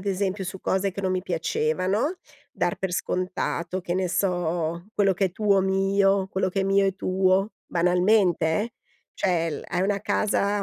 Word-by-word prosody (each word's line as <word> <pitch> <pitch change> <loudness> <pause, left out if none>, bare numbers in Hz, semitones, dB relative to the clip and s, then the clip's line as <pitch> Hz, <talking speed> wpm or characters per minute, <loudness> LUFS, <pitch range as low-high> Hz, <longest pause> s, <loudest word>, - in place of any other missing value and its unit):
ad 200 - -11
esempio, 195 0 -1
su 185 +1 -6
cose 190 0 0
che 200 - -6
non 185 -1 0
mi 185 - 0
piacevano, 185 - 0 0.4
dar 175 -10 -1
per 190 -2 -3
scontato, 180 0 -2
che 175 - -3
ne 185 0 0
so, 170 -2 -1
quello 195 -2 +3
che 195 +1 +1
è 180 - -7
tuo 200 -1 +2
mio, 195 0 +2
quello 190 0 0
che 195 +1 -1
è - - +1
mio 195 0 +3
è 195 - 0
tuo, 190 +2 +1 0.2
banalmente, 180 0 +3 0.2
eh. 230 +2 -6 0.4
Cioè 170 -3 0
l 150 - -5
hai 180 -1 -1
una 200 +1 0
casa 205 -1 0
190 Hz, 180 wpm, -25 LUFS, 180-195 Hz, 0.4 s, quello